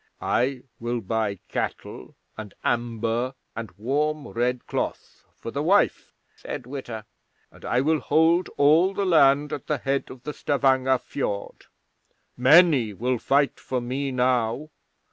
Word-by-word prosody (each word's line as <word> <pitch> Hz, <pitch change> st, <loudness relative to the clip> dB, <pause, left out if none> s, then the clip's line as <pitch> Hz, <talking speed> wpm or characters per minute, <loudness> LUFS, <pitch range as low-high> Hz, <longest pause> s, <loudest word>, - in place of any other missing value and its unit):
'"I 125 Hz, +1 st, 0 dB, 0.2 s
will 120 Hz, +1 st, -2 dB
buy 110 Hz, -1 st, -2 dB
cattle 60 Hz, -, -5 dB, 0.2 s
and 110 Hz, -2 st, -9 dB
amber 120 Hz, +2 st, -1 dB, 0.2 s
and 115 Hz, -2 st, -5 dB
warm 145 Hz, +6 st, -1 dB
red 125 Hz, +1 st, -1 dB
cloth -, -, -5 dB
for -, -, -7 dB
the -, -, -2 dB
wife," -, -, +2 dB, 0.2 s
said -, -, -7 dB
Witta, 120 Hz, -5 st, -7 dB, 0.5 s
"and -, -, -18 dB
I 125 Hz, -, +1 dB
will 155 Hz, +2 st, +2 dB
hold 165 Hz, +5 st, +2 dB
all 160 Hz, +7 st, +4 dB
the 200 Hz, -, 0 dB
land 145 Hz, -4 st, +4 dB
at 140 Hz, -, -6 dB
the 150 Hz, -, 0 dB
head 135 Hz, +2 st, -1 dB
of 130 Hz, -, -11 dB
Stavanger 130 Hz, -2 st, +2 dB
Fiord. 105 Hz, -6 st, -5 dB, 0.7 s
Many 130 Hz, -, +5 dB
will 125 Hz, +4 st, -1 dB
fight 140 Hz, +3 st, +1 dB
for 130 Hz, -, -3 dB
me 130 Hz, +3 st, -3 dB
now. 125 Hz, +2 st, 0 dB
130 Hz, 135 wpm, -25 LUFS, 120-145 Hz, 0.7 s, Many